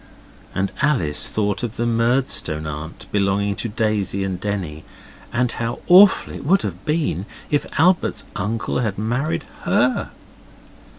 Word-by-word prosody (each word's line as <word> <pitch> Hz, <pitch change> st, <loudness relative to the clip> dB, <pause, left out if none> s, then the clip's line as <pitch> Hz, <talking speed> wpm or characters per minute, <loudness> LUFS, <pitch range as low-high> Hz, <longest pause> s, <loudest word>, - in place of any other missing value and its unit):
And 95 Hz, +1 st, 0 dB
Alice 110 Hz, -, +1 dB
thought 105 Hz, -2 st, -1 dB
of 120 Hz, -2 st, -4 dB
the 120 Hz, -, -1 dB
Murdstone 115 Hz, -, +1 dB
aunt 75 Hz, +2 st, -6 dB
belonging 100 Hz, 0 st, +1 dB
to 115 Hz, -, -3 dB
Daisy 105 Hz, -3 st, 0 dB
and 95 Hz, -2 st, -3 dB
Denny, 90 Hz, -7 st, -3 dB, 0.5 s
and 120 Hz, 0 st, +1 dB
how 115 Hz, 0 st, -3 dB
awful 190 Hz, +2 st, +7 dB
it -, -, -7 dB
would 190 Hz, +7 st, +3 dB
have -, -, -5 dB
been 150 Hz, -, -1 dB, 0.2 s
if 145 Hz, -, +1 dB
Albert's 180 Hz, +3 st, +3 dB
uncle 110 Hz, +3 st, -2 dB
had 110 Hz, -5 st, -1 dB
married 120 Hz, +9 st, -1 dB, 0.2 s
HER. -, -, +1 dB
110 Hz, 135 wpm, -21 LUFS, 95-125 Hz, 0.5 s, awful